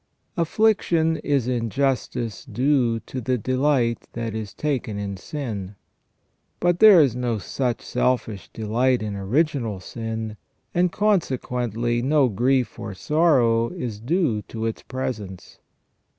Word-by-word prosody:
Affliction 170 Hz, -3 st, +2 dB
is 140 Hz, -5 st, 0 dB
in 120 Hz, -2 st, -1 dB
justice 130 Hz, -3 st, -1 dB
due 125 Hz, -4 st, +1 dB
to 130 Hz, +4 st, -6 dB
the 125 Hz, +2 st, 0 dB
delight 130 Hz, 0 st, +1 dB
that 115 Hz, -2 st, -3 dB
is 110 Hz, -2 st, -5 dB
taken 130 Hz, -8 st, -2 dB
in 100 Hz, -1 st, -3 dB
sin. 105 Hz, -4 st, -5 dB, 0.8 s
But 175 Hz, 0 st, +2 dB
there 215 Hz, -5 st, +9 dB
is 135 Hz, -6 st, +2 dB
no 120 Hz, -2 st, -1 dB
such 120 Hz, +5 st, -2 dB
selfish 110 Hz, -5 st, -1 dB
delight 120 Hz, +2 st, +1 dB
in 105 Hz, -1 st, -3 dB
original 115 Hz, -, 0 dB
sin, 110 Hz, +1 st, -5 dB, 0.4 s
and 175 Hz, 0 st, +2 dB
consequently 125 Hz, -, 0 dB
no 140 Hz, 0 st, +3 dB
grief 125 Hz, +4 st, +1 dB
or 110 Hz, -4 st, -6 dB
sorrow 125 Hz, -, +3 dB
is 125 Hz, -, -5 dB
due 130 Hz, -, 0 dB
to 110 Hz, -1 st, -4 dB
its 115 Hz, -, -3 dB
presence. 105 Hz, -8 st, -6 dB
125 Hz, 125 wpm, -23 LUFS, 110-145 Hz, 0.8 s, there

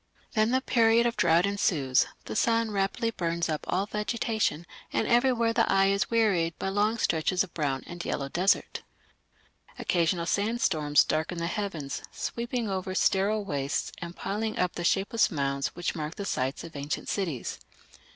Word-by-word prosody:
Then 215 Hz, 0 st, +3 dB
the 260 Hz, +2 st, +2 dB
period 230 Hz, -2 st, +4 dB
of 235 Hz, -, +1 dB
drought 170 Hz, +1 st, +4 dB
ensues; 155 Hz, -10 st, +2 dB, 0.2 s
the -, -, -5 dB
sun 230 Hz, 0 st, +2 dB
rapidly 205 Hz, +4 st, 0 dB
burns 170 Hz, -4 st, -1 dB
up 155 Hz, -2 st, -2 dB
all 190 Hz, +2 st, +1 dB
vegetation, 210 Hz, -4 st, -1 dB, 0.3 s
and -, -, 0 dB
everywhere 240 Hz, -2 st, +3 dB
the 230 Hz, 0 st, +2 dB
eye 195 Hz, 0 st, +4 dB
is 200 Hz, 0 st, +1 dB
wearied 195 Hz, -8 st, +2 dB
by 190 Hz, -, -2 dB
long 210 Hz, +3 st, +1 dB
stretches 180 Hz, -1 st, +1 dB
of 190 Hz, -, -11 dB
brown 140 Hz, -4 st, -1 dB
and 175 Hz, 0 st, -7 dB
yellow 140 Hz, -, -2 dB
desert. 180 Hz, +7 st, +1 dB, 1.0 s
Occasional 170 Hz, 0 st, +1 dB
sandstorms 180 Hz, -9 st, +2 dB
darken 160 Hz, +3 st, -1 dB
the 170 Hz, -, -2 dB
heavens, 170 Hz, -7 st, -3 dB
sweeping 235 Hz, 0 st, -3 dB
over 190 Hz, -1 st, -3 dB
sterile 200 Hz, +2 st, +2 dB
wastes 140 Hz, -5 st, -2 dB
and 170 Hz, 0 st, -7 dB
piling 215 Hz, +2 st, -3 dB
up 180 Hz, -1 st, +1 dB
the 175 Hz, -, -5 dB
shapeless 195 Hz, +5 st, +2 dB
mounds 140 Hz, -3 st, -1 dB
which 175 Hz, 0 st, -2 dB
mark 155 Hz, 0 st, -5 dB
the 200 Hz, -, -5 dB
sites 130 Hz, -5 st, -2 dB
of 165 Hz, -, -10 dB
ancient 145 Hz, +1 st, -4 dB
cities. 165 Hz, -, -3 dB
190 Hz, 160 wpm, -28 LUFS, 165-220 Hz, 1.0 s, period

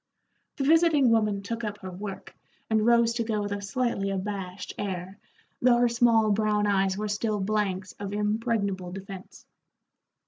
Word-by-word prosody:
The 280 Hz, -, -1 dB
visiting 310 Hz, -4 st, +4 dB
woman 210 Hz, -3 st, +1 dB
took 230 Hz, +3 st, -4 dB
up 210 Hz, -1 st, -3 dB
her 185 Hz, -1 st, -6 dB
work, 195 Hz, +1 st, -8 dB, 0.4 s
and 220 Hz, -1 st, +3 dB
rose 235 Hz, 0 st, +4 dB
to 230 Hz, 0 st, -1 dB
go 215 Hz, -2 st, -1 dB
with 205 Hz, -, -4 dB
a 200 Hz, 0 st, -3 dB
slightly 200 Hz, -1 st, -1 dB
abashed 195 Hz, -1 st, -4 dB
air, 190 Hz, 0 st, -4 dB, 0.4 s
though 245 Hz, -1 st, +5 dB
her 240 Hz, 0 st, +3 dB
small 230 Hz, -2 st, +3 dB
brown 210 Hz, 0 st, +1 dB
eyes 195 Hz, -1 st, +1 dB
were 210 Hz, +1 st, -2 dB
still 210 Hz, 0 st, -1 dB
blanks 195 Hz, -2 st, -1 dB
of 200 Hz, -1 st, -5 dB
impregnable 210 Hz, -3 st, -1 dB
defence. 195 Hz, 0 st, -9 dB
210 Hz, 160 wpm, -27 LUFS, 195-230 Hz, 0.4 s, though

